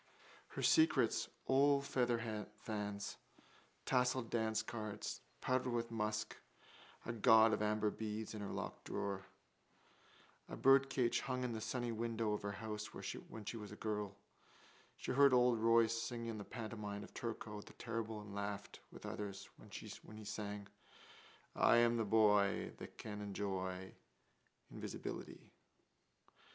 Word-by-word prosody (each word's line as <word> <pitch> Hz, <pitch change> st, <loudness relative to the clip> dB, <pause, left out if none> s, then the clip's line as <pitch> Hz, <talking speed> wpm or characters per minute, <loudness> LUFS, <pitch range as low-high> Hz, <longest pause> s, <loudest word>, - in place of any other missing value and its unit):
Her -, -, -5 dB
secrets: 320 Hz, -1 st, +4 dB, 0.2 s
old 140 Hz, +1 st, +5 dB
featherfans, 110 Hz, -4 st, -2 dB, 0.7 s
tasselled 125 Hz, -2 st, +2 dB
dancecards, 110 Hz, -2 st, -1 dB, 0.2 s
powdered 130 Hz, 0 st, +1 dB
with 115 Hz, -1 st, -1 dB
musk, 105 Hz, -1 st, -1 dB, 0.7 s
a 115 Hz, -, -2 dB
gaud 110 Hz, 0 st, +7 dB
of -, -, 0 dB
amber 105 Hz, 0 st, +2 dB
beads 110 Hz, 0 st, -4 dB
in 105 Hz, -, -5 dB
her 100 Hz, -, -4 dB
locked -, -, -5 dB
drawer. 95 Hz, -1 st, -3 dB, 1.2 s
A -, -, -5 dB
birdcage 135 Hz, -2 st, +5 dB
hung 125 Hz, -1 st, -2 dB
in 125 Hz, -2 st, -1 dB
the 110 Hz, -, -3 dB
sunny 120 Hz, +1 st, -1 dB
window 115 Hz, -1 st, 0 dB
of 105 Hz, -, -2 dB
her 100 Hz, 0 st, -3 dB
house 105 Hz, +1 st, -4 dB
when 110 Hz, -2 st, -6 dB
she 115 Hz, -, -3 dB
was 105 Hz, -2 st, -7 dB
a -, -, -7 dB
girl. 105 Hz, -2 st, -2 dB, 0.8 s
She -, -, -3 dB
heard 140 Hz, 0 st, +7 dB
old 125 Hz, -2 st, +5 dB
Royce 115 Hz, 0 st, +4 dB
sing 120 Hz, -2 st, -3 dB
in 115 Hz, -2 st, -3 dB
the 100 Hz, -, -6 dB
pantomime 105 Hz, -3 st, -5 dB
of -, -, -12 dB
Turko 110 Hz, -2 st, -4 dB
the -, -, -13 dB
Terrible 115 Hz, -2 st, -3 dB
and 105 Hz, -1 st, -9 dB
laughed 100 Hz, 0 st, -4 dB
with -, -, -10 dB
others 100 Hz, -1 st, -5 dB
when -, -, -14 dB, 0.5 s
he 110 Hz, -, -9 dB
sang: 105 Hz, -1 st, -4 dB, 0.9 s
I -, -, +6 dB
am 120 Hz, 0 st, +5 dB
the 115 Hz, -, +1 dB
boy 105 Hz, -2 st, +4 dB
That -, -, -9 dB
can 105 Hz, -1 st, -5 dB
enjoy 95 Hz, -2 st, -3 dB, 0.8 s
Invisibility. -, -, -6 dB
110 Hz, 135 wpm, -38 LUFS, 105-115 Hz, 1.2 s, gaud